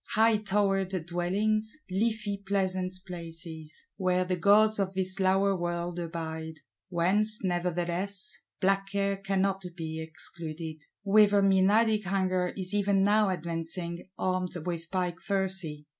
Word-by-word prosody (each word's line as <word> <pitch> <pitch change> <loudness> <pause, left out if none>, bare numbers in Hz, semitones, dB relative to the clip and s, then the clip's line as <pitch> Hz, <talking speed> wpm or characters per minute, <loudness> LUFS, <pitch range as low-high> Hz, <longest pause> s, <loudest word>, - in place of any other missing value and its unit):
High 220 0 +5
towered 195 -3 0
dwellings, 210 - 0
leafy 215 0 0
pleasant 190 -2 0
places; 165 -3 -8
where 185 -1 +1
the 185 0 0
gods 210 +4 +4
of 195 -1 -1
this 190 +1 +1
lower 195 +1 +3
world 175 0 -3
abide: 160 -1 -5 0.3
whence, 200 +5 +2
nevertheless, 180 +2 -1 0.2
black 195 0 +2
Care 200 0 0
cannot 195 0 0
be 160 -1 -4
excluded; 160 -1 -7 0.2
whither 205 0 +5
Menadic 210 +3 +4
Hunger 185 -1 +1
is 185 0 -2
even 200 -1 +3
now 210 0 +4
advancing, 170 0 -4
armed 185 -1 -1
with 170 -1 -4
pike 180 -2 -1
thyrsi! 190 -6 -2
185 Hz, 120 wpm, -29 LUFS, 175-200 Hz, 0.3 s, High